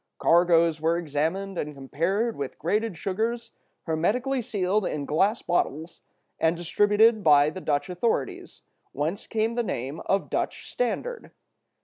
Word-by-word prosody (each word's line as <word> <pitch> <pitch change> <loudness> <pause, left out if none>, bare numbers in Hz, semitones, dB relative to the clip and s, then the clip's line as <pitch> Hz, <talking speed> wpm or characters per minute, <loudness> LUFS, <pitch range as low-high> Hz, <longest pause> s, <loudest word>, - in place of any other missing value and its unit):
Cargoes 170 -2 +4
were 165 +1 +2
examined 170 +5 -2
and 150 0 -4
compared 175 - -1
with 140 -2 -5
graded 210 +3 -1
sugars 225 +6 -2 0.3
hermetically 240 - 0
sealed 210 -3 0
in 150 -5 -3
glass 195 +10 +1
bottles 165 -1 -2 0.4
and 165 +1 +2
distributed 210 +5 +3
by 145 -1 +5
the 185 - -8
Dutch 145 -1 0
authorities, 180 - -2 0.3
whence 155 +7 -3
came 225 0 0
the 240 - 0
name 140 - -4
of 195 0 0
"Dutch - - -2
standard." - - -3
180 Hz, 130 wpm, -26 LUFS, 155-220 Hz, 0.4 s, by